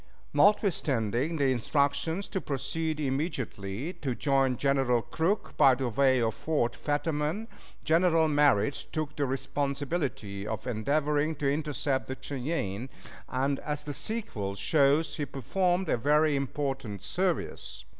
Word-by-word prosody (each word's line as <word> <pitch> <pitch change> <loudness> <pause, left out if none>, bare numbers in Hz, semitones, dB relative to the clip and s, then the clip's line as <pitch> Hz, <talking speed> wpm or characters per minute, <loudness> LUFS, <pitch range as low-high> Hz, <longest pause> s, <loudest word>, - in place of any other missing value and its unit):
Notwithstanding 150 - +2
the 140 -3 +3
instructions 140 - 0
to 190 - -2
proceed 150 +3 -2
immediately 135 - -3
to 130 -4 -1
join 135 -3 +2
General 135 -3 +2
Crook 180 +6 -1
by 135 -2 +7
the 130 -1 -2
way 130 +2 +3
of 115 -2 +1
Fort 145 +1 -1
Fetterman, 150 +7 -1 0.4
General 165 0 +4
Merritt 145 -4 +3
took 155 -1 -3
the 145 -3 0
responsibility 135 - -2
of 110 0 -4
endeavoring 145 +6 0
to 145 -1 -2
intercept 145 -2 -1
the 130 - -5
Cheyennes, 130 - -3 0.4
and, 135 +2 0
as 150 0 -3
the 145 - -5
sequel 130 - -4
shows, 145 +8 +2
he 145 - -1
performed 180 - 0
a - - +2
very 150 +4 +3
important 135 -6 -3
service. 180 -1 -2
140 Hz, 125 wpm, -29 LUFS, 130-155 Hz, 0.4 s, by